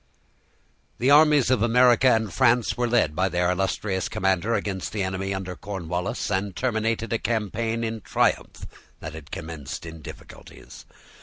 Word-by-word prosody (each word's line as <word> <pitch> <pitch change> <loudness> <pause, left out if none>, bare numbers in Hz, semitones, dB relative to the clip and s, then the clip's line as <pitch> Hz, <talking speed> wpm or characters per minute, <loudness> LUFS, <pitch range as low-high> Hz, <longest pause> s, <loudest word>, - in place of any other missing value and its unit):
The 130 +4 +2
armies 150 -3 +5
of 125 -5 +2
America 125 +2 +4
and 110 -6 +2
France 125 -2 +3
were 120 0 0
led 115 -11 +2
by 95 +3 +1
their 90 0 +1
illustrious 95 0 -1
commander 95 +4 0
against 95 -3 -3
the 105 -3 -1
enemy 95 +1 -3
under 95 -1 -4
Cornwallis, 90 -1 -4
and 95 0 -1
terminated 115 -2 -1
a 115 - 0
campaign 115 +1 -2
in 110 -1 -3
triumph - - -1 0.3
that 80 - -7
had 80 -1 -10
commenced 80 -2 -7
in 80 -1 -9
difficulties. - - -12
105 Hz, 150 wpm, -24 LUFS, 90-115 Hz, 0.3 s, armies